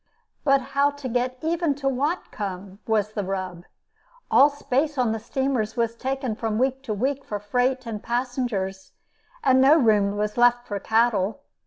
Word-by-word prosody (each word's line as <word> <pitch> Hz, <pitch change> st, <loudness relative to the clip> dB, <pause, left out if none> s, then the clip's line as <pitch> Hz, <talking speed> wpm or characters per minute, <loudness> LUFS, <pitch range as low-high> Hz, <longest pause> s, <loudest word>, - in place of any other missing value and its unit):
But 275 Hz, -1 st, +4 dB
how 280 Hz, +1 st, +4 dB
to 285 Hz, -2 st, -7 dB
get 250 Hz, +1 st, -1 dB
even 330 Hz, -2 st, 0 dB
to 280 Hz, 0 st, -9 dB
Whatcom 205 Hz, -, -3 dB
was 215 Hz, -1 st, +1 dB
the 205 Hz, -, -2 dB
rub. 185 Hz, -2 st, -4 dB, 0.7 s
All 285 Hz, -, +7 dB
space 285 Hz, +1 st, -1 dB
on 245 Hz, -3 st, +2 dB
the 225 Hz, -, -2 dB
steamers 240 Hz, -2 st, -2 dB
was 230 Hz, -1 st, 0 dB
taken 260 Hz, -1 st, -3 dB
from 220 Hz, -1 st, -2 dB
week 265 Hz, +2 st, 0 dB
to 220 Hz, -, -2 dB
week 270 Hz, +6 st, -1 dB
for 210 Hz, -, -4 dB
freight 250 Hz, +5 st, 0 dB
and 220 Hz, -3 st, -5 dB
passengers, 235 Hz, -6 st, -3 dB, 0.5 s
and 260 Hz, 0 st, +5 dB
no 285 Hz, +4 st, +7 dB
room 205 Hz, -6 st, +3 dB
was 210 Hz, +1 st, -2 dB
left 240 Hz, 0 st, +4 dB
for 205 Hz, -1 st, -4 dB
cattle. 220 Hz, +1 st, +1 dB
240 Hz, 165 wpm, -24 LUFS, 210-270 Hz, 0.7 s, All